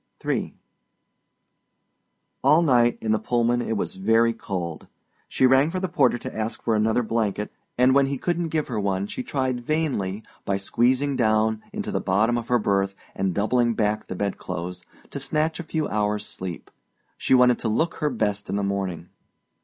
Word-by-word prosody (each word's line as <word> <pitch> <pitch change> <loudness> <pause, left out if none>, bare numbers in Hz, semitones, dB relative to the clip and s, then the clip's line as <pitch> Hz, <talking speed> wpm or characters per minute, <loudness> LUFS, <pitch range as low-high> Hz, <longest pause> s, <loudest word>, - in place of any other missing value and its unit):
III - - -1 1.9
All 160 +3 +5
night 120 -5 +4
in 110 - -1
the 110 - +2
Pullman 120 +2 +1
it 115 -2 -2
was - - -2
very 115 +4 +3
cold. 90 -7 -5 0.4
She - - +2
rang 130 +4 +5
for 185 +2 -2
the 185 - -1
porter 135 -8 +2
to - - -7
ask 110 +1 -2
for 115 - +1
another 110 +3 +2
blanket, 110 -2 -1 0.3
and 125 +1 +5
when 140 0 +4
he 140 0 -2
couldn't 175 +4 -1
give 155 -1 -1
her 115 -4 -2
one 100 -1 0
she 105 - -5
tried 130 - -2
vainly, 120 -10 -1 0.2
by 100 - 0
squeezing 130 +7 +1
down 110 -2 +2
into 210 0 -4
the - - -1
bottom 105 +5 +2
of 120 -1 -3
her 125 - +3
berth 100 -2 0 0.2
and 95 -2 -1
doubling 120 +3 +2
back 105 0 0
the - - -5
bedclothes, 90 -2 -4 0.3
to 140 - -4
snatch 155 +4 -1
a - - -4
few 160 -1 -2
hours' 105 0 -1
sleep. 90 -4 -6 0.4
She - - +2
wanted 125 -1 +5
to 115 - -1
look 160 +10 0
her 150 - 0
best 105 -5 -2
in - - -1
the 100 - 0
morning. 95 -4 -3
115 Hz, 180 wpm, -24 LUFS, 100-130 Hz, 1.9 s, All